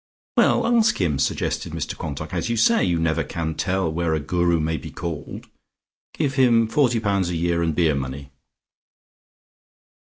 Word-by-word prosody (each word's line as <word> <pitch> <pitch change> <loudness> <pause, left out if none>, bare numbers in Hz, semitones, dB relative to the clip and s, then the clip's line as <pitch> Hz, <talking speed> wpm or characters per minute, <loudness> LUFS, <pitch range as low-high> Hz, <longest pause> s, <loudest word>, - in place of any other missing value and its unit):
"Well, - - +3
ask 230 -2 +3
him," 75 -7 0
suggested - - -1
Mr - - -4
Quantock, 75 +2 -6
"as 85 +1 -2
you 115 - 0
say, 230 - +4
you 85 -1 +1
never 80 -1 0
can 80 -1 -4
tell 95 0 -1
where 85 -1 0
a - - -1
Guru 85 +2 +1
may 80 +1 -1
be - - -8
called. 80 -4 -6 0.7
Give 145 -4 -1
him 120 -4 +4
forty 120 0 +2
pounds 100 -4 0
a 90 - -2
year 85 0 0
and 80 -2 0
beer 80 -3 +3
money." 70 0 -5
85 Hz, 165 wpm, -23 LUFS, 80-110 Hz, 0.7 s, say